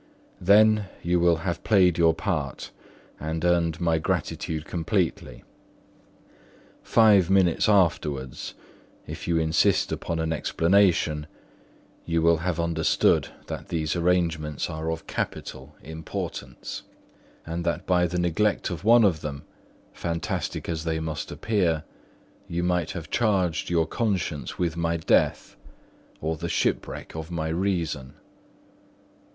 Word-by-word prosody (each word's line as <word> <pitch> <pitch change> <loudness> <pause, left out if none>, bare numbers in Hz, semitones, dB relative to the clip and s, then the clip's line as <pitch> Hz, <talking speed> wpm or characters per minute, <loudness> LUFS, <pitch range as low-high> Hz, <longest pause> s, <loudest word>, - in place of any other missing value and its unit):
Then 105 +1 +5
you 85 +1 +2
will 85 0 +4
have 85 -2 -2
played 95 -5 +4
your 80 -1 +4
part 80 -8 -3 0.5
and 80 +2 -3
earned 85 -2 +2
my 85 -2 +1
gratitude 80 0 -2
completely. 90 +1 -2 1.4
Five 105 -6 +5
minutes 95 0 +3
afterwards, 75 - 0 0.5
if - - -7
you 85 -1 +2
insist 80 0 +2
upon 85 - -3
an 80 0 -1
explanation, 80 -2 +2 0.8
you 85 -1 0
will 85 0 +5
have 85 0 -2
understood 85 -1 +2 0.2
that - - -6
these 80 -1 -1
arrangements 85 -4 0
are 80 +1 -4
of 80 0 -5
capital 70 +3 -5
importance; 80 +1 -6 0.6
and 85 +1 -4
that 85 +2 -2
by 90 -1 +3
the 90 +1 -3
neglect 90 +4 +1
of 85 - -5
one 115 +2 +6
of 85 -7 +2
them, 70 -2 -5 0.5
fantastic 85 -1 -3
as 80 -2 -3
they 80 -1 -1
must 80 -2 -4
appear, 90 -8 0 0.6
you 85 +1 -2
might 90 -3 0
have 80 -4 -7
charged 95 -8 +1
your 85 -2 +2
conscience 90 -6 -2
with 85 -2 -1
my 85 0 0
death 80 - +1 0.7
or 80 +1 -2
the 85 +2 -4
shipwreck - - -2
of 80 0 -6
my 80 -2 -3
reason. 80 -7 -2
85 Hz, 125 wpm, -25 LUFS, 80-90 Hz, 1.4 s, one